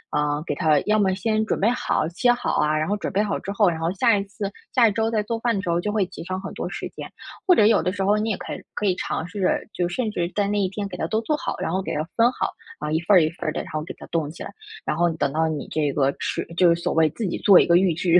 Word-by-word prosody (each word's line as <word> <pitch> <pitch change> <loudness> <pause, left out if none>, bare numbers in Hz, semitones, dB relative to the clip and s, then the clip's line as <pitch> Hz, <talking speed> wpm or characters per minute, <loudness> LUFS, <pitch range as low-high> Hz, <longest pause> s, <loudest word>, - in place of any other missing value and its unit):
嗯， 150 +1 0
给 - - -2
它 155 -4 +3
要 215 0 +2
么 190 -2 +2
先 215 +3 0
准 - - 0
备 205 - +4
好， 245 -9 0
切 240 +8 +2
好 245 - -1
啊， 150 0 +2
然 155 +1 0
后 205 - +1
准 - - -4
备 200 +2 +1
好 205 -1 -2
之 195 - -5
后， 205 0 +3
然 165 -2 -3
后 165 +1 0
下 230 +2 +3
一 195 - -1
次 200 0 -5 0.2
下 240 -3 +6
一 - - +2
周 220 +2 0
在 220 -2 0
做 225 +2 -3
饭 235 0 +1
的 195 - -1
时 180 - -3
候 170 0 +2
就 210 - -2
会 210 -3 +2
节 185 - -9
省 185 +1 -3
很 195 - -7
多 - - -4
时 - - -5
间。 - - -9 0.4
或 365 - +7
者 210 - +5
有 215 -1 +5
的 180 - 0
时 195 0 -3
候 205 +2 +3
你 215 +1 -1
也 210 - -1
可 - - -6
以 - - -7
可 210 - -2
以 190 - +3
尝 165 - -3
试， 190 0 -1
就 175 -1 0
甚 220 +4 -2
至 175 -4 -2
在 205 - +2
那 205 0 0
一 195 - +2
天 200 +1 -4
给 180 - -7
它 160 - -2
都 220 +5 0
做 300 +7 0
好， - - -3
然 - - -2
后 190 +2 0
给 - - -4
它 150 - 0
分 235 +1 +5
好， - - -2 0.3
啊， 150 +1 -3
1 160 - +2
份 185 +4 +4
儿 - - +7
1 155 - +1
份 165 - -7
儿 - - -1
的， - - -3
然 - - -11
后 155 0 -2
给 - - -7
它 - - -10
冻 160 -3 -1
起 155 - -9
来。 - - -7 0.3
然 150 - -1
后 175 +1 +3
等 140 -3 -1
到 160 +2 +1
你 155 -2 -4
这 150 -2 0
个 140 -2 +2
吃 - - -2
就 175 -2 +6
是 170 - -8
所 - - -1
谓 160 -1 +4
自 225 - -4
己 175 - -2
做 195 -3 +7
一 - - +4
个 170 - +5
预 180 -2 +3
制 170 +2 +4
190 Hz, 345 characters per minute, -23 LUFS, 165-210 Hz, 0.4 s, 或